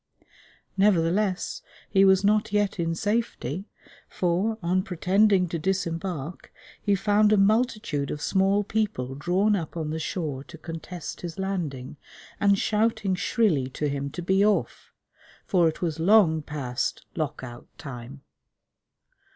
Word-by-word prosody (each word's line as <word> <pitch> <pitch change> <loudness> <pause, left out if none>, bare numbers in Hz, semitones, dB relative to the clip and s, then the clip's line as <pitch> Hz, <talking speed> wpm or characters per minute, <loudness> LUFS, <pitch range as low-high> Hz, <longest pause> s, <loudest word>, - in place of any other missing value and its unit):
Nevertheless, 190 0 +1 0.3
he 195 -1 +4
was 190 0 +5
not 210 0 +2
yet 205 -2 0
in 165 -1 0
safety; 205 - -2 0.4
for, 185 +5 0
on 180 +2 +2
pretending 190 +1 +2
to 165 - -3
disembark, 170 -3 -3 0.3
he 205 - +2
found 210 +2 +3
a 215 - +5
multitude 210 - +1
of 150 - -4
small 195 +5 +2
people 200 -12 -2
drawn 185 +9 +1
up 170 -3 -4
on 155 -2 -3
the 160 - -3
shore 150 -5 -3
to 170 - -12
contest 165 +1 -7
his 170 -2 -6
landing, 160 -9 -4 0.4
and 200 -1 +4
shouting 210 -2 +1
shrilly 185 - +1
to 150 +3 -2
him 140 0 -3
to 175 +5 -6
be 190 +3 +3
off, 210 0 0 0.5
for 175 -4 +3
it 160 - -7
was 165 -2 -2
long 170 -3 +5
past 140 -5 -3
Lock 150 -3 -3
out 120 -1 -9
Time. 135 0 -9
180 Hz, 135 wpm, -26 LUFS, 155-205 Hz, 0.5 s, was